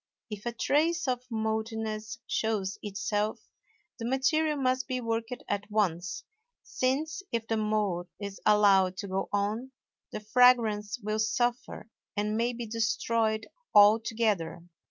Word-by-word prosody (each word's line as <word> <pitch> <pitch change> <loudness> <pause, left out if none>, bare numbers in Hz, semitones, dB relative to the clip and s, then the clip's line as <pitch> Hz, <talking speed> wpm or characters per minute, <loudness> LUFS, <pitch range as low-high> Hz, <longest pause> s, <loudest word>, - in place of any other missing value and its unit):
If 210 +2 -6
a - - 0
trace 315 +7 +1
of 250 0 -2
mouldiness 220 -1 -3
shows 210 -3 -1
itself, 205 +1 -2 0.5
the 230 - -3
material 300 +4 +2
must 260 -1 0
be 255 -1 -2
worked 230 -1 -2 0.2
at 205 0 -2
once, 190 -4 -1 0.4
since, 295 +6 -1
if 230 -1 -1
the 225 - 0
mould 210 -5 0
is 200 -1 -7
allowed 195 -3 +4
to 200 - -5
go 190 0 -2
on, 215 +6 -1 0.4
the - - -4
fragrance 220 -2 +3
will 215 +1 -1
suffer 235 +1 -1 0.3
and 210 +1 0
may 235 +2 +1
be 240 -1 -5
destroyed 225 0 0 0.3
altogether. 210 -5 +4
220 Hz, 130 wpm, -29 LUFS, 205-240 Hz, 0.5 s, allowed